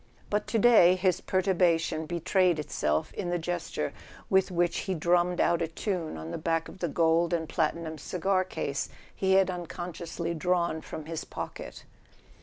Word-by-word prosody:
But 210 Hz, 0 st, 0 dB
to 230 Hz, -, 0 dB
day 210 Hz, -6 st, +7 dB
his 185 Hz, -1 st, +1 dB
perturbation 175 Hz, -4 st, +1 dB
betrayed 175 Hz, +1 st, +2 dB
itself 75 Hz, -, -1 dB
in 185 Hz, -4 st, -3 dB
the 175 Hz, -, +1 dB
gesture 170 Hz, -, -3 dB, 0.4 s
with 190 Hz, 0 st, +4 dB
which 175 Hz, -1 st, +1 dB
he 190 Hz, -, +1 dB
dru 170 Hz, +2 st, +3 dB
mm 175 Hz, +1 st, +1 dB
ed 175 Hz, -, -6 dB
out 170 Hz, -1 st, +3 dB
a 165 Hz, -, +1 dB
tune 165 Hz, -, -3 dB
on 80 Hz, +1 st, -7 dB
the -, -, -4 dB
back 165 Hz, 0 st, 0 dB
of -, -, -12 dB
the 175 Hz, -, 0 dB
gold 165 Hz, +1 st, +2 dB
and 165 Hz, -2 st, 0 dB
platinum 160 Hz, 0 st, -1 dB
cigar 185 Hz, +5 st, 0 dB
case 140 Hz, -7 st, -3 dB, 0.3 s
he 190 Hz, 0 st, +2 dB
had 190 Hz, -1 st, +4 dB
unconsciously 170 Hz, -1 st, -5 dB
drawn 170 Hz, -1 st, 0 dB
from 155 Hz, 0 st, -7 dB
his 165 Hz, 0 st, -4 dB
pocket. -, -, -7 dB
175 Hz, 175 wpm, -28 LUFS, 160-185 Hz, 0.4 s, day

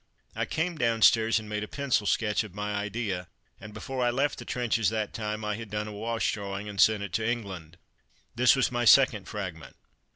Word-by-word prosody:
I -, -, -1 dB
came 165 Hz, 0 st, -2 dB
downstairs 115 Hz, -1 st, +4 dB
and 110 Hz, -1 st, -5 dB
made 105 Hz, 0 st, -3 dB
a -, -, -5 dB
pencil 130 Hz, -7 st, 0 dB
sketch 105 Hz, 0 st, +1 dB
of 100 Hz, -4 st, -11 dB
my 105 Hz, 0 st, -3 dB
idea, 100 Hz, -3 st, -3 dB, 0.3 s
and 105 Hz, +2 st, -10 dB
before 125 Hz, +4 st, -4 dB
I 120 Hz, -, +3 dB
left 135 Hz, +4 st, 0 dB
the -, -, -8 dB
trenches 120 Hz, -3 st, 0 dB
that 110 Hz, -2 st, -3 dB
time 105 Hz, -1 st, -4 dB
I 105 Hz, -1 st, -2 dB
had 115 Hz, -2 st, -8 dB
done 105 Hz, +1 st, -3 dB
a -, -, -6 dB
wash 115 Hz, +2 st, -1 dB
drawing 100 Hz, 0 st, -5 dB
and 100 Hz, -1 st, -1 dB
sent 110 Hz, -2 st, +4 dB
it 100 Hz, -, -7 dB
to 110 Hz, 0 st, 0 dB
England. 95 Hz, -8 st, -5 dB, 0.6 s
This 125 Hz, +2 st, +5 dB
was 135 Hz, -2 st, +1 dB
my 120 Hz, -1 st, -1 dB
second 115 Hz, -5 st, +5 dB
"Fragment." 90 Hz, -8 st, -6 dB
110 Hz, 205 wpm, -28 LUFS, 105-120 Hz, 0.6 s, This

